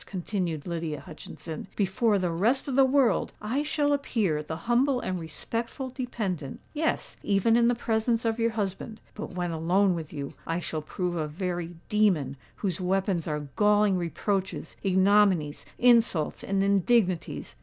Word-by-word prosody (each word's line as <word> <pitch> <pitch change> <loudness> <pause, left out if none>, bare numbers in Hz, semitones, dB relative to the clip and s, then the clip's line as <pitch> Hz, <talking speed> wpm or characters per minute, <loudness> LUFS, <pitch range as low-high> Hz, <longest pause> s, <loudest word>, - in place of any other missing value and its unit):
continued 180 -5 -3
Lydia 165 -4 -3
Hutchinson. 155 +1 -8
"Before 205 +2 +2
the 180 -3 0
rest 225 +13 +1
of 270 - -2
the 270 - +6
world 265 -2 +2
I 235 +7 -1
shall 295 -1 +1
appear 215 - 0
the 150 +1 -5
humble 250 +2 +3
and 185 -5 -3
respectful 230 - -4
dependant—yes, 240 - -3
even 205 +3 +3
in 235 0 +5
the 245 - +3
presence 230 0 0
of 225 0 0
your 230 0 +3
husband. 215 0 -4
But 210 -3 -7
when 175 -1 -1
alone 180 +4 +2
with 160 -3 -5
you, 140 -3 -5
I 165 +1 0
shall 160 -3 -3
prove 175 +3 -3
a 155 -2 -1
very 175 +1 -4
demon, 185 -11 +2 0.2
whose 185 -3 -2
weapons 185 -2 0
are 150 -2 -3
galling 210 -1 +4
reproaches, 185 +2 -2
ignominies, 190 -5 +3
insults, 235 -10 +3
and 195 0 0
indignities." 195 -2 +1
195 Hz, 150 wpm, -27 LUFS, 170-230 Hz, 0.2 s, the